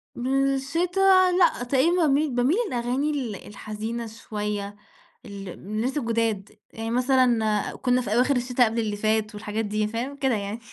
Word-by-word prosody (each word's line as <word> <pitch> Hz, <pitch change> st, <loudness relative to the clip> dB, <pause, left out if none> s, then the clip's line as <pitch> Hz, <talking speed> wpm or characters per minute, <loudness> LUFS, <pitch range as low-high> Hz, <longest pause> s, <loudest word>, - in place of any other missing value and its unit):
بالشتا، 330 Hz, +9 st, +2 dB
لأ، 345 Hz, -8 st, +3 dB
تقريبًا 270 Hz, +7 st, +2 dB
باميل 290 Hz, +2 st, +2 dB
باميل 255 Hz, +9 st, +2 dB
للأغاني 250 Hz, +4 st, -1 dB
ال 255 Hz, -8 st, -3 dB
الحزينة 215 Hz, +3 st, -5 dB
شويّة، 210 Hz, -2 st, -5 dB, 0.5 s
ال 200 Hz, -3 st, -8 dB
الناس 215 Hz, -, -3 dB
الجُداد، 230 Hz, -5 st, -1 dB, 0.2 s
يعني 225 Hz, 0 st, -4 dB
مثلًا 245 Hz, -4 st, +2 dB
كُنّا 250 Hz, 0 st, +1 dB
في 215 Hz, -4 st, -3 dB
أواخر 255 Hz, +4 st, +3 dB
الشتا 250 Hz, 0 st, +2 dB
قبل 225 Hz, +1 st, -1 dB
اللي 215 Hz, -2 st, -1 dB
فات 215 Hz, 0 st, 0 dB
والحاجات 215 Hz, +1 st, -3 dB
دي، 210 Hz, +1 st, -1 dB
فاهم 235 Hz, +6 st, -4 dB
كده 265 Hz, -3 st, +1 dB
يعني. 205 Hz, +2 st, -4 dB
235 Hz, 145 wpm, -25 LUFS, 215-270 Hz, 0.5 s, لأ